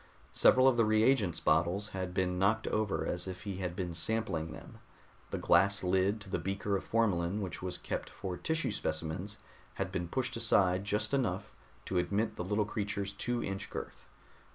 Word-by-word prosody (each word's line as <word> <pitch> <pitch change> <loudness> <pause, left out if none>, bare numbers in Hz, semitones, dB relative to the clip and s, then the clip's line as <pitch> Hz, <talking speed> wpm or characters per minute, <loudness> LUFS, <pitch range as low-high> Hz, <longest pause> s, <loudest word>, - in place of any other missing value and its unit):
Several 130 +1 +6
of 130 -3 +4
the 115 - +5
reagents 110 -4 +3
bottles 85 +6 +2
had 95 -2 -4
been 90 -1 0
knocked 110 +4 +2
over 110 -2 0
as 90 +1 -3
if 95 0 -6
he 100 -3 -4
had 90 -2 -3
been 90 -2 -3
sampling 85 -2 -1
them. 75 - -11 0.5
The - - -3
glass 100 0 +4
lid 95 +3 +2
to 100 - -10
the - - 0
beaker 100 +1 -1
of 95 - -2
formalin 100 -4 +1
which 95 -4 -5
was 90 -1 -3
kept - - -4
for 95 -2 -5
tissue 155 - -1
specimens 85 +3 -3 0.4
had 95 -1 -2
been 90 -2 -2
pushed 130 +7 -2
aside 95 -5 +3
just 105 +5 0
enough 115 -9 0 0.3
to 90 - 0
admit 105 +4 0
the 90 - -3
little 105 +3 +1
creature's 100 -1 -3
two 120 +4 -2
inch 95 +1 -4
girth. - - -7
100 Hz, 180 wpm, -32 LUFS, 90-110 Hz, 0.5 s, Several